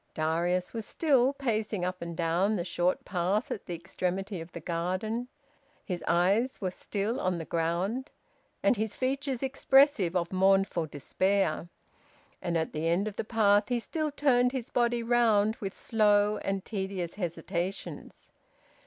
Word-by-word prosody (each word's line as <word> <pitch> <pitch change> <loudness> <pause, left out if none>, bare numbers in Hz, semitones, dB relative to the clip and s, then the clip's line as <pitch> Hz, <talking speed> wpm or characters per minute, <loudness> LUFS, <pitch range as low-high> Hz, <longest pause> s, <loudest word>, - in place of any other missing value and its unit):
Darius 170 +3 0
was 225 -2 -4
still 270 -5 +3
pacing 220 -8 -1
up 185 0 -4
and 170 -1 -5
down 175 +5 +1
the 175 - -1
short 175 +1 0
path 185 +5 0
at - - -5
the 175 - -3
extremity 185 +2 -3
of 165 +2 -10
the - - -7
garden; 185 +8 -2 0.6
his 180 -3 -4
eyes 200 +9 +2
were 185 -3 -2
still 210 +6 -3
on 185 -1 0
the 165 - -5
ground, 180 - -1 0.5
and - - +4
his 215 0 -2
features 265 0 -1
expressive 270 - +4
of 170 0 -1
mournful 190 -3 +3
despair, 175 +4 0 0.7
and 170 -1 0
at 160 - -2
the 155 +2 -1
end 175 +5 +1
of 210 - -5
the - - -2
path 210 -1 +3
he 245 - +1
still 310 +5 -2
turned 255 -4 +2
his 255 -3 -4
body 240 -1 +1
round 225 -3 +3
with 195 -1 -5
slow 210 -2 +3
and 195 -1 -3
tedious 190 -4 -3
hesitations. 180 0 -5
195 Hz, 155 wpm, -29 LUFS, 175-230 Hz, 0.7 s, and